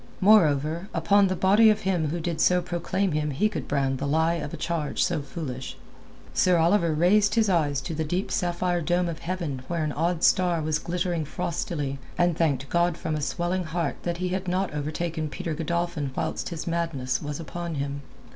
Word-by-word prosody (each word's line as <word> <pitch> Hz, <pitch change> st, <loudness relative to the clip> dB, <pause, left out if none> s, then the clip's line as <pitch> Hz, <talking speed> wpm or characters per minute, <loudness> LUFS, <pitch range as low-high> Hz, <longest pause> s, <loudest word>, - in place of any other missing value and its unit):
Moreover, 170 Hz, -3 st, +4 dB
upon 200 Hz, 0 st, +4 dB
the 185 Hz, -, -1 dB
body 205 Hz, +5 st, +5 dB
of 215 Hz, 0 st, +2 dB
him 180 Hz, -5 st, 0 dB
who 170 Hz, +4 st, -2 dB
did 165 Hz, -1 st, -2 dB
so 180 Hz, 0 st, +4 dB
proclaim 180 Hz, +2 st, -1 dB
him 150 Hz, 0 st, 0 dB
he 145 Hz, +10 st, +1 dB
could 210 Hz, -, -5 dB
brand 135 Hz, -2 st, 0 dB
the 140 Hz, -, -2 dB
lie 160 Hz, +3 st, +2 dB
of 150 Hz, -4 st, -4 dB
a -, -, -6 dB
charge 165 Hz, -4 st, -1 dB
so -, -, 0 dB
foolish. 135 Hz, -3 st, -6 dB, 0.6 s
Sir 180 Hz, -1 st, +4 dB
Oliver 170 Hz, +1 st, +3 dB
raised 200 Hz, +7 st, +3 dB
his 220 Hz, -3 st, +3 dB
eyes 145 Hz, -5 st, +1 dB
to 135 Hz, -, -5 dB
the 160 Hz, +1 st, -1 dB
deep 175 Hz, +5 st, -2 dB
sapphire 175 Hz, 0 st, 0 dB
dome 175 Hz, +2 st, +1 dB
of 165 Hz, -2 st, -4 dB
heaven 165 Hz, -7 st, -3 dB
where 170 Hz, -2 st, -1 dB
an 155 Hz, -, -1 dB
odd 165 Hz, +3 st, -1 dB
star 175 Hz, -2 st, +3 dB
was 155 Hz, -1 st, 0 dB
glittering 175 Hz, -1 st, -1 dB
frostily, 145 Hz, -2 st, -3 dB, 0.2 s
and 175 Hz, -1 st, +3 dB
thanked 140 Hz, -5 st, 0 dB
God 170 Hz, +1 st, +1 dB
from 160 Hz, -, -3 dB
a 150 Hz, -, -2 dB
swelling 175 Hz, +6 st, -1 dB
heart 160 Hz, -2 st, -2 dB
that 170 Hz, -1 st, -2 dB
he 180 Hz, +1 st, -2 dB
had 185 Hz, +1 st, -3 dB
not 185 Hz, -1 st, 0 dB
overtaken 155 Hz, +2 st, -3 dB
Peter 170 Hz, +1 st, -4 dB
Godolphin 170 Hz, -1 st, -2 dB
whilst 160 Hz, -, -2 dB
his 165 Hz, -3 st, -5 dB
madness 165 Hz, -7 st, -1 dB
was 145 Hz, 0 st, -4 dB
upon 170 Hz, +1 st, -5 dB
him. 140 Hz, 0 st, -3 dB
170 Hz, 195 wpm, -26 LUFS, 150-180 Hz, 0.6 s, body